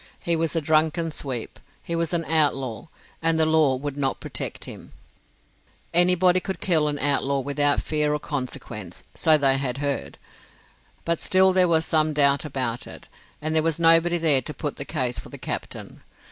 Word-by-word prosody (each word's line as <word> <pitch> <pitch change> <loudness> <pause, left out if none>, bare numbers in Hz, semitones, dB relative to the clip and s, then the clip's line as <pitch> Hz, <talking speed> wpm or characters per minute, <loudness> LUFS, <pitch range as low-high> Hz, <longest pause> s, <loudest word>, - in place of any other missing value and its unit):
He 170 - 0
was 165 -1 -1
a 165 - +1
drunken 160 +2 +1
sweep. 130 -6 -5 0.2
He 170 - -4
was 165 -1 -1
an 170 -2 -1
outlaw, 135 -7 +1 0.4
and 165 0 +1
the 160 - +4
law 155 -4 +3
would 140 +2 -5
not 135 -2 -1
protect - - -6
him. - - -11 1.0
Anybody 180 +1 +4
could 190 +1 -5
kill 160 -5 +1
an 145 -1 -2
outlaw 140 -1 +1
without 145 +1 +1
fear 150 -1 0
of 150 - -6
consequences, 120 - -6
so 160 -1 +4
they 135 -2 +2
had 130 -2 -3
heard. 140 0 -3 0.9
But 170 -1 0
still 190 0 +3
there 185 -1 +4
was 160 -1 +2
some 155 -1 +2
doubt 140 0 +3
about 130 -5 -3
it, - - -11 0.3
and 155 +1 -1
there 160 - +3
was 165 -1 0
nobody 165 +1 +5
there 155 -5 +3
to 150 - -6
put 145 -2 -4
the - - -5
case 130 -6 -2
for - - -11
the - - -10
captain. - - -6
155 Hz, 180 wpm, -24 LUFS, 140-165 Hz, 1.0 s, nobody